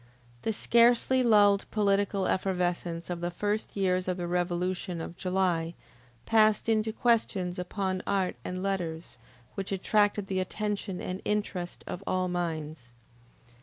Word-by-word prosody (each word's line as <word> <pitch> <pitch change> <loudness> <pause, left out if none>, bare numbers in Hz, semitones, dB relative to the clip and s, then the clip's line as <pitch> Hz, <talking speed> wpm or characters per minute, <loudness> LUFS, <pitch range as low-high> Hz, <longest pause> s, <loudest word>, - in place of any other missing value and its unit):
The 225 - 0
scarcely 235 +4 +4
lulled 205 -4 +4
political 200 -2 +1
effervescence 175 -2 -1
of 170 -1 -4
the 175 - -1
first 205 +4 -2
years 185 -1 +1
of 185 0 -1
the 175 - -3
revolution 180 0 -1
of 165 +1 -6
July, 180 -3 0 0.5
passed 215 -1 +4
into 220 -1 +2
questions 210 -6 +1
upon 185 0 -2
art 195 -2 0
and 185 +1 -4
letters, 175 -4 -3 0.4
which 195 0 -5
attracted 205 +1 +2
the 190 -1 -1
attention 200 0 -3
and 185 +1 -4
interest 200 -4 -2
of 185 - -6
all 185 0 +1
minds. 160 -7 -4
185 Hz, 130 wpm, -29 LUFS, 175-205 Hz, 0.5 s, scarcely